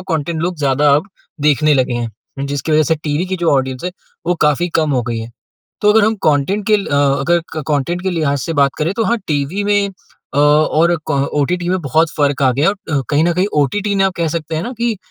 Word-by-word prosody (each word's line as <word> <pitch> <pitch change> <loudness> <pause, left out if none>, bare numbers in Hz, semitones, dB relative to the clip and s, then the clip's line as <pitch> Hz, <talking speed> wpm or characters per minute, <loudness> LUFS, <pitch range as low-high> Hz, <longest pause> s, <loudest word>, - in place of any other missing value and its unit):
Content 160 +1 -2
लोग 180 0 -2
ज़्यादा 140 0 +2
अब 155 +8 -3 0.4
देखने 150 +1 +3
लगे 130 -2 +1
हैं। 120 +4 -6
जिसकी 145 +3 -2
वज़ह 155 0 +5
से 160 +2 +1
टीवी 150 +4 0
की 190 0 -2
जो 170 -2 +1
ऑडियंस 130 -1 -1
है 180 - -1 0.4
वो 175 - +2
काफ़ी 150 +4 +1
कम 155 - 0
हो 125 - +1
गयी 115 -1 -3
है। 115 +1 -7 0.5
तो 210 0 +5
अगर 220 -1 +4
हम 220 - +2
कंटेंट 155 +8 +1
के 215 - +4
ल 200 - -4 0.3
अगर 170 +4 +2 0.2
कंटेंट 155 +4 -1
के 190 - -1
लिहाज़ 150 -5 0
से 165 - -3
बात 140 - +3
करें 160 +4 0
तो 225 - +1
हाँ, 235 0 +1
टीवी 150 +7 -1
में 205 0 +2 0.5
अ, - - +1
और 155 +3 +3
क - - +2 0.2
ओटीटी 175 +5 0
में 185 0 0
बहुत 155 +3 +1
फ़र्क 145 -2 +1
आ 130 - +5
गया 140 +7 +2
है। 200 - +1 0.2
और 135 - +1
कहीं 145 +1 +3
न 175 - +2
कहीं 180 +3 +1 0.2
ओटीटी 205 +8 -1
ने 195 -1 +2
आप 190 - +1
कह 170 -1 0
सकते 160 -1 -4
हैं 160 - -2
ना 245 - -5
कि 235 -2 0
155 Hz, 240 wpm, -17 LUFS, 140-180 Hz, 0.5 s, वज़ह